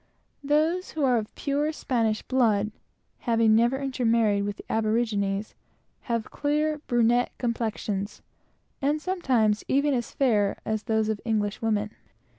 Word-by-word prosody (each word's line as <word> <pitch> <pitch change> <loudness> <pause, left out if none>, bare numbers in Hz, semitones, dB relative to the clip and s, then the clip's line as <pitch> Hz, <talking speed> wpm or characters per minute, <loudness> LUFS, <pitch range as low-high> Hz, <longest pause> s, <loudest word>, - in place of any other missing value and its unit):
Those 310 +6 +1
who 310 - -2
are 250 -3 +4
of 215 - -8
pure 290 +2 0
Spanish 230 -8 -1
blood, 220 -5 +2 0.5
having 230 -2 +3
never 235 +4 +3
intermarried 230 -6 +1
with 205 0 -4
the - - -11
aborigines, 215 -2 0 0.6
have 230 -2 -1
clear 300 +1 0
brunette 240 0 +2
complexions, 220 -4 -3 0.6
and 290 +2 +1
sometimes, 255 - +1
even 280 +1 +2
as 240 -2 -1
fair 210 -7 +1
as 220 -1 -1
those 220 -2 +1
of 215 -1 -2
English 215 -2 -1
women. 215 -2 0
230 Hz, 130 wpm, -26 LUFS, 215-270 Hz, 0.6 s, are